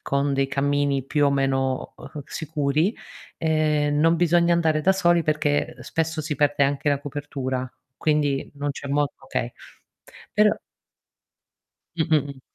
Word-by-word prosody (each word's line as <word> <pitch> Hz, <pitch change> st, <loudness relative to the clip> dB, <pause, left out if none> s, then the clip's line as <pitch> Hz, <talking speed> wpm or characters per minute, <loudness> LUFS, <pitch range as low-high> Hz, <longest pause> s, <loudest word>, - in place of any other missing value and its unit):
con 140 Hz, 0 st, 0 dB
dei 135 Hz, 0 st, +1 dB
cammini 140 Hz, 0 st, 0 dB
più 145 Hz, +1 st, +2 dB
o -, -, +3 dB
meno, 135 Hz, -1 st, 0 dB
uhm, 150 Hz, -, -9 dB
sicuri, 155 Hz, +5 st, -1 dB, 0.4 s
ehm, 150 Hz, -2 st, +1 dB
non 165 Hz, +2 st, +4 dB
bisogna 170 Hz, 0 st, +3 dB
andare 160 Hz, -2 st, +2 dB
da 190 Hz, +5 st, +4 dB
soli 175 Hz, -3 st, +2 dB
perché, 150 Hz, -1 st, 0 dB
uhm, -, -, -16 dB
spesso 160 Hz, -1 st, -2 dB
si 150 Hz, -1 st, -3 dB
perde 145 Hz, 0 st, +2 dB
anche 140 Hz, +1 st, +1 dB
la 140 Hz, -1 st, +1 dB
copertura, 135 Hz, -3 st, -4 dB, 0.3 s
quindi 150 Hz, -3 st, 0 dB
non 145 Hz, 0 st, -2 dB
c'è 140 Hz, -, -7 dB
modo 145 Hz, -1 st, 0 dB
okay. -, -, -3 dB, 0.8 s
Però 210 Hz, 0 st, +4 dB, 1.4 s
Mh-mh-mh. 150 Hz, -4 st, 0 dB
145 Hz, 140 wpm, -24 LUFS, 140-160 Hz, 1.4 s, non